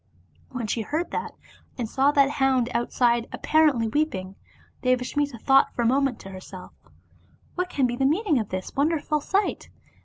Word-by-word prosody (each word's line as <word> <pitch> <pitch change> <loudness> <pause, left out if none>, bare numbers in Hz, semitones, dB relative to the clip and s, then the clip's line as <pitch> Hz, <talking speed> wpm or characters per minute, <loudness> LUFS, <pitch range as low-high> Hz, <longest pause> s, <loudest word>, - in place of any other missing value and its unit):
When 250 -3 -4
she 225 +2 -1
heard 310 +10 -3
that, - - -4 0.4
and 240 -3 -2
saw 270 +5 +2
that 280 -2 +4
hound 265 -3 +1
outside 235 0 +1
appar 315 0 +3
ently 230 -5 -2
weeping, 195 -12 -1 0.5
Devasmita 255 +2 0
thought 270 +4 +4
for 240 - 0
a - - 0
moment 270 +1 +2
to 195 - -10
herself, 185 0 -10 0.8
"What 360 0 -2
can 275 -6 +1
be 240 -1 -1
the 270 - +1
meaning 320 - +1
of 215 - -4
this 185 0 -5
wonderful 300 +1 0
sight?" 395 +7 -1
265 Hz, 165 wpm, -25 LUFS, 235-290 Hz, 0.8 s, that